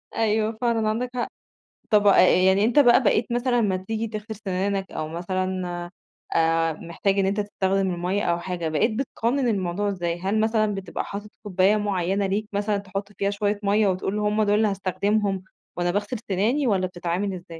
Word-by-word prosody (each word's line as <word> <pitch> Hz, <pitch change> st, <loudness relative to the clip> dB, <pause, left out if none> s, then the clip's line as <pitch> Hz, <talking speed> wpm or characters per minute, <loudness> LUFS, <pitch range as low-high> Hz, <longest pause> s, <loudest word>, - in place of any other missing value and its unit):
أيوه، 220 Hz, 0 st, +1 dB
فعلًا 230 Hz, -3 st, +1 dB
عندك 245 Hz, +3 st, -1 dB
حق، 240 Hz, -, -1 dB, 0.6 s
طَب 210 Hz, -1 st, +4 dB, 0.4 s
يعني 195 Hz, +2 st, +4 dB
أنت 240 Hz, +5 st, +2 dB
بقى 250 Hz, -1 st, +6 dB
بقيت 220 Hz, +1 st, +2 dB
مثلًا 245 Hz, 0 st, +1 dB
لمّا 195 Hz, -4 st, +1 dB
تيجي 220 Hz, +4 st, -3 dB
تغسل 215 Hz, +1 st, -6 dB
سنانك، 195 Hz, 0 st, -1 dB
أو 155 Hz, 0 st, -4 dB
مثلًا، 180 Hz, 0 st, -3 dB, 0.4 s
آآ، 165 Hz, 0 st, +2 dB
محتاج 170 Hz, +5 st, -2 dB
إن 195 Hz, -, +3 dB
أنت 200 Hz, +2 st, 0 dB
تستخدم 195 Hz, -1 st, 0 dB
المَيّة 180 Hz, +4 st, -1 dB
أو 170 Hz, -3 st, +1 dB
حاجة، 175 Hz, -2 st, -3 dB
بقيت 155 Hz, +9 st, +1 dB
بتقنّن 255 Hz, 0 st, 0 dB
الموضوع 195 Hz, -1 st, -1 dB
إزاي؟ 175 Hz, -3 st, -2 dB
هل 200 Hz, +3 st, 0 dB
مثلًا 215 Hz, -1 st, +1 dB
بتبقى 195 Hz, -1 st, -4 dB
حاطط 205 Hz, +1 st, -7 dB
كوباية 195 Hz, +1 st, +2 dB
معيّنة 195 Hz, -1 st, 0 dB
ليك 210 Hz, +2 st, -2 dB
مثلًا 205 Hz, 0 st, 0 dB
تحط 200 Hz, +1 st, -6 dB
فيها 200 Hz, 0 st, -1 dB
شوية 205 Hz, 0 st, -1 dB
مَيّة 205 Hz, 0 st, +3 dB
وتقول 190 Hz, +2 st, -1 dB
هم 210 Hz, +1 st, +1 dB
دول 205 Hz, 0 st, +2 dB
اللي 215 Hz, 0 st, +3 dB
هاستخدمهم، 195 Hz, 0 st, 0 dB, 0.3 s
وأنا 175 Hz, 0 st, 0 dB
باغسل 205 Hz, +7 st, -2 dB
سناني 230 Hz, +9 st, +1 dB
والَّا 190 Hz, -4 st, +2 dB
بتتعامل 180 Hz, +2 st, -3 dB
إزاي؟ 175 Hz, -1 st, -9 dB
200 Hz, 175 wpm, -24 LUFS, 185-215 Hz, 0.6 s, بقى